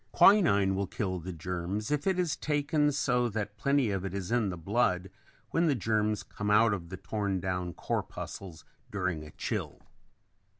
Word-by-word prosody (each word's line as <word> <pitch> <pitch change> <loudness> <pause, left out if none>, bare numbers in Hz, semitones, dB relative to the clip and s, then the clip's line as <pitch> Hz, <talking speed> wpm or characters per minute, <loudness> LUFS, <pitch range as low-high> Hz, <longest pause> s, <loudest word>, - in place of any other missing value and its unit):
Quinine 100 - +6
will 95 0 -1
kill 95 -1 -2
the 90 +3 -6
germs 90 - -3
if 150 +4 0
it 190 -1 +2
is 175 -5 +1
taken 150 0 +1
so 125 -3 +1
that 105 -1 -3
plenty 135 0 +2
of 95 -2 -2
it 95 0 -4
is 100 +1 -4
in 120 -4 +2
the 90 - -4
blood 95 0 0 0.4
when 165 +1 +2
the 145 - +3
germs 110 -1 0
come 105 0 -4
out 105 +1 +5
of 85 -4 -5
the 95 - -6
torn 100 0 -2
down 90 -1 -2
corpuscles 85 -5 -5 0.2
during 90 -6 -2
a 75 - -10
chill. - - -4
105 Hz, 175 wpm, -30 LUFS, 95-125 Hz, 0.4 s, Quinine